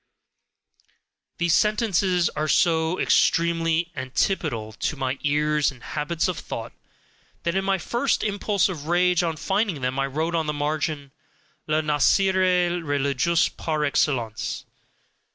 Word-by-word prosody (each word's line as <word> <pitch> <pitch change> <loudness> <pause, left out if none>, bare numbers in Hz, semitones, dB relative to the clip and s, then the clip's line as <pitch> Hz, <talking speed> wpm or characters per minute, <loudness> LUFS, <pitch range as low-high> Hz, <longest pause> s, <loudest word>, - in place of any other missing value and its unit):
These 170 -1 +1
sentences 195 -5 +2
are 155 +1 -3
so 165 +1 +2
extremely 165 0 +2
ANTIPODAL 130 - -1
to 130 - -3
my 130 0 -2
ears 150 0 +1
and 125 -3 -16
habits 160 +3 -2
of 180 -3 -3
thought, - - -6 0.7
that 170 - 0
in 195 +1 0
my 195 0 +1
first 240 +8 -1
impulse 205 -1 +1
of 160 -6 -6
rage 180 +1 +3
on 165 -2 -2
finding 195 - -1
them, 130 +1 -1
I 135 - +1
wrote 160 +5 -2
on 160 -2 0
the 150 - -1
margin, 150 -1 -2 0.6
"LA 155 0 +2
NIAISERIE 180 +3 +2
RELIGIEUSE 145 +3 +1
PAR 155 -2 -2
EXCELLENCE!" 120 -6 -1
160 Hz, 130 wpm, -24 LUFS, 145-180 Hz, 0.7 s, rage